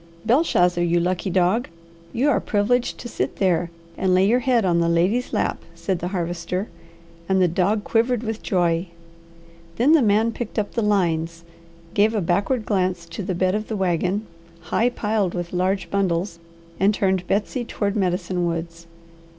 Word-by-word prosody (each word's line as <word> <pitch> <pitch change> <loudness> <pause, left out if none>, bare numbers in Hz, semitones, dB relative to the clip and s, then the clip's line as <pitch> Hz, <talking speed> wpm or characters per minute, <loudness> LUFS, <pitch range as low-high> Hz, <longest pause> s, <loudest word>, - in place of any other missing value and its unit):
"Belshazzar, 195 - +3
you 175 0 +2
lucky 180 +2 -1
dog, 185 +7 +2 0.4
you 255 +9 +1
are 290 - +3
privileged 235 +4 0
to 240 - -7
sit - - -3
there 175 -3 +1 0.3
and 185 -1 +1
lay 185 +1 +4
your 235 +5 +3
head 245 -4 +2
on 170 -2 +2
the 170 0 +2
lady's 185 +9 +1
lap," - - -1
said 170 +2 -2
the 175 - -3
Harvester, 180 +1 -3 0.6
and 190 0 +3
the 180 - +4
dog 195 +5 +1
quivered 235 +1 +1
with 220 -1 -4
joy. 175 -1 0 0.9
Then 250 - +3
the 320 -2 +6
man 220 +1 +3
picked 235 0 -6
up 210 -2 -1
the 230 - 0
lines, 170 -5 0 0.5
gave 215 +2 +3
a - - +2
backward 200 +7 0
glance 185 -4 0
to - - -6
the 185 -1 -3
bed 185 +1 +1
of 215 +1 -2
the 220 - -3
wagon, 185 +3 0 0.5
high 235 +2 +3
piled 210 -6 -1
with 175 0 -4
large 185 +2 -1
bundles, 180 -2 -1 0.4
and 200 +3 +3
turned 190 -3 0
Betsy 215 +5 -1
toward 205 -3 -2
Medicine 180 -2 0
Woods. 165 0 -5
190 Hz, 170 wpm, -22 LUFS, 175-215 Hz, 0.9 s, the